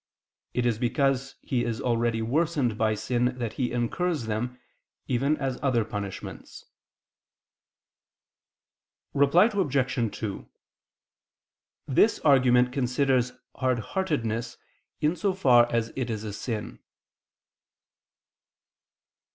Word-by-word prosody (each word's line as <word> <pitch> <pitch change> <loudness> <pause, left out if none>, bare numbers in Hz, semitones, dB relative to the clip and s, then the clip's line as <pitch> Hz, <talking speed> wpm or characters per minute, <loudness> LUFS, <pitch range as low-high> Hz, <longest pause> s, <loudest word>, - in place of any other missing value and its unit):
It 125 - +1
is 115 -3 +1
because 135 +2 0
he 125 -2 0
is 115 -2 -2
already 115 -2 0
worsened 140 -2 +1
by 110 0 +1
sin 125 +3 -1
that 115 -3 -3
he 125 -1 -2
incurs 125 +5 -1
them, 120 +3 -3 0.5
even 135 +5 +1
as 135 -3 -3
other 125 -5 +1
punishments. 100 -3 -7 2.5
Reply 150 +10 +5
Obj. 135 - 0
2: 105 -3 -5 1.4
This 180 - +3
argument 125 -3 +4
considers 125 -1 +1 0.2
hardheartedness 120 - -1 0.4
in 150 +3 +2
so 190 +2 0
far 120 -9 +5
as 115 -1 -1
it 130 -2 -2
is 110 -2 -3
a 105 -2 -5
sin. 105 +1 -5
125 Hz, 100 wpm, -27 LUFS, 115-140 Hz, 2.5 s, Reply